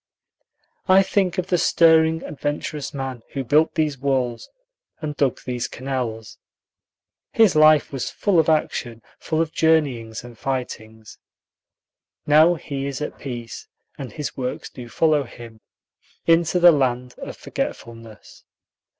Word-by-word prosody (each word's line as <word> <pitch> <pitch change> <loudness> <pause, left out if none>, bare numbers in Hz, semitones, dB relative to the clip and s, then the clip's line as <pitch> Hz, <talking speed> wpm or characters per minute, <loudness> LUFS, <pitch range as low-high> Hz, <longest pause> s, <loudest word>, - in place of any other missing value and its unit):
I 190 0 +6
think 190 -1 0
of 185 - 0
the 180 -2 0
stirring, 160 0 +4
adventurous 145 0 -4
man 135 -3 -5
who 135 - -2
built 150 +5 +2
these 150 -4 0
walls 130 -3 -1 0.5
and 150 -2 -5
dug 140 -4 0
these 125 -2 -3
canals. 125 -4 -5 0.9
His 220 -7 +4
life 155 0 +5
was 135 - -3
full 195 -5 +1
of 160 - +2
action, 120 -7 -1 0.2
full 155 - -2
of 160 - -8
journeyings 135 -10 +1
and 120 -1 -12
fightings. 110 -5 -6 1.1
Now 155 +4 +5
he 140 -3 -5
is 140 -2 -4
at 150 - -6
peace, 120 -4 -7 0.3
and 130 -5 -8
his 140 -2 -5
works 130 -1 -5
do 120 -2 -10
follow 155 0 +2
him 115 -3 -11 0.6
into 165 +1 +3
the 175 0 +8
land 125 -4 0
of - - -8
forgetfulness. 115 -2 -7
140 Hz, 135 wpm, -22 LUFS, 120-160 Hz, 1.1 s, the